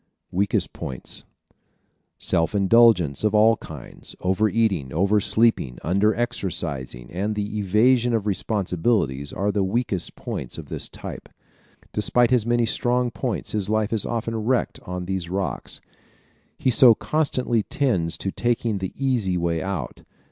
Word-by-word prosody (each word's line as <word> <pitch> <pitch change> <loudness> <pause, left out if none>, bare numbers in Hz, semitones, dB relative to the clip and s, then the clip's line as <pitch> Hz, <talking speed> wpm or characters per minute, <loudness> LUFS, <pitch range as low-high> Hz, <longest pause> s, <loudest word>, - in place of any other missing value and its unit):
Weakest 100 +3 0
Points 65 -2 -6 0.2
¶ - - -34 0.6
Self 80 +5 0
indulgence 100 - +4
of 105 0 +2
all 110 +2 +6
kinds, 75 -6 -10
over 95 +4 +2
eating, 100 - 0
over 100 +7 +2
sleeping, 105 - +2
under 100 +6 +2
exercising 80 - -3
and 100 +5 -2
the 105 0 -3
evasion 115 +5 +3
of 110 -3 -1
responsibilities 90 - 0
are 100 +2 -1
the 100 -1 0
weakest 95 -2 -1
points - - -6
of - - -9
this - - -3
type. - - -9 0.6
Despite 120 +3 +2
his 120 -3 +2
many 120 0 +2
strong 120 +2 +1
points 120 -1 -3
his 105 -2 -1
life 110 0 +1
is 110 - +2
often 115 -1 -3
wrecked 120 +3 0
on 90 0 -4
these 95 -2 -3
rocks. 95 +1 -3 0.8
He 130 - +1
so 120 0 +7
constantly 130 -7 0
tends 105 - 0
to 95 - -3
taking 115 -3 0
the 95 -1 -4
easy 120 -9 0
way 85 -1 0
out. 95 -10 -4
105 Hz, 145 wpm, -23 LUFS, 90-115 Hz, 0.8 s, so